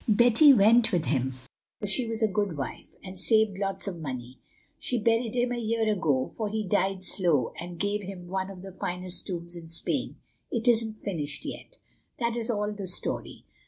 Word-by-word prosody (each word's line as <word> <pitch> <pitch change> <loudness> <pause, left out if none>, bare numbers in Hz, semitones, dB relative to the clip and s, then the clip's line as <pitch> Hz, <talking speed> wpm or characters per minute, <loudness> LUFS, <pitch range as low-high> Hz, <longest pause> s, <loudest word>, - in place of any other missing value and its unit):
Betty 240 +6 +7
went 225 0 +6
with 175 -5 +1
him, 130 -2 0 0.5
for - - -4
she 225 +5 +2
was 225 0 -2
a - - +5
good 200 -4 -1
wife, 135 - -6
and 185 -1 -6
saved 220 0 +3
lots 195 0 -2
of 180 -4 -4
money. 125 -3 -6 0.4
She 245 - 0
buried 230 +1 +1
him 245 0 +1
a 245 - -1
year 225 0 0
ago, 145 -10 0
for 215 -2 -2
he 215 -1 -2
died 190 +1 +1
slow, 175 -8 +2
and 175 0 -7
gave 205 +3 0
him 185 -2 -8
one 190 +1 -2
of 190 -2 -10
the 195 - -8
finest 180 0 -3
tombs 170 -2 -5
in 170 -1 -9
Spain—it 225 +7 -3
isn't 225 -2 +3
finished 155 -9 -2
yet. - - -8 0.4
That 235 -1 -1
is 235 0 -1
all 210 -2 0
the 200 -2 -6
story. 180 - -2
195 Hz, 190 wpm, -28 LUFS, 175-225 Hz, 0.5 s, Betty